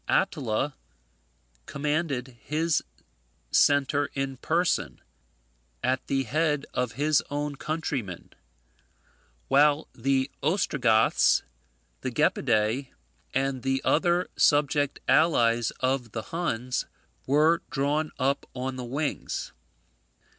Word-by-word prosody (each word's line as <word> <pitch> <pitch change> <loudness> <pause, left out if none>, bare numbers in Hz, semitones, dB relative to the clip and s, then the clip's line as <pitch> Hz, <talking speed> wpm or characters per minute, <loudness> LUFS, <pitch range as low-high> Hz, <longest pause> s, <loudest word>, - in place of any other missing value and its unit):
Attila 130 +4 0 0.9
commanded 140 -4 -2
his 155 +1 0 0.7
centre 145 0 +3
in 135 -1 -2
person, 170 +6 0 0.8
at 130 0 0
the 135 -1 +1
head 150 0 0
of 125 -3 -1
his 150 +3 +2
own 145 0 -3
countrymen, 140 - -4 1.1
while 145 +2 +4
the 135 +2 0
Ostrogoths, 135 - +3 0.6
the - - -2
Gepidae, 110 +4 +1 0.5
and 135 -1 0
the 135 +1 0
other 175 +2 +2
subject 145 -1 +2
allies 120 -8 +3
of 130 -3 -1
the 110 - -3
Huns, 125 -8 -2 0.4
were 155 +5 +4
drawn 150 +1 0
up 140 +1 0
on 130 +1 -3
the 125 - -4
wings. 140 +5 -3
140 Hz, 95 wpm, -27 LUFS, 130-150 Hz, 1.1 s, while